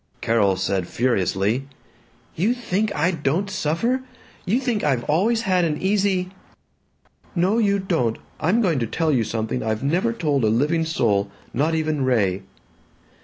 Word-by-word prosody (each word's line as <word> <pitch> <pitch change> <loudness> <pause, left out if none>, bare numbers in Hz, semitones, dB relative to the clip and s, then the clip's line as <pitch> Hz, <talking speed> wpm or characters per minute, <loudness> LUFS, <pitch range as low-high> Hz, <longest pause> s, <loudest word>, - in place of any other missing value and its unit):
Carol 105 -4 +2
said 95 -1 -1
furiously, 115 +1 0 0.7
"You 210 +9 +1
think 215 -3 -1
I 165 +4 +2
don't 165 +4 -1
suffer? 190 - 0 0.5
You 220 +7 +2
think 245 -5 -1
I've 135 -5 +1
always 215 - +1
had 185 -4 +2
an 155 -2 0
easy 190 -2 +1 0.5
" - - -40 0.3
"No, 190 +6 +2
you 200 -3 +3
don't. 165 - 0 0.2
I'm 210 +9 +2
going 165 -8 +1
to 115 - -1
tell 160 +6 0
you 125 -5 +2
something 110 +2 -2
I've 110 +2 -2
never 175 +11 +1
told 150 - 0
a - - +4
living 150 +9 +1
soul, 105 -10 +1 0.2
not 155 +6 +1
even 155 -3 0
Ray." 100 -7 +1
155 Hz, 155 wpm, -22 LUFS, 115-190 Hz, 0.7 s, a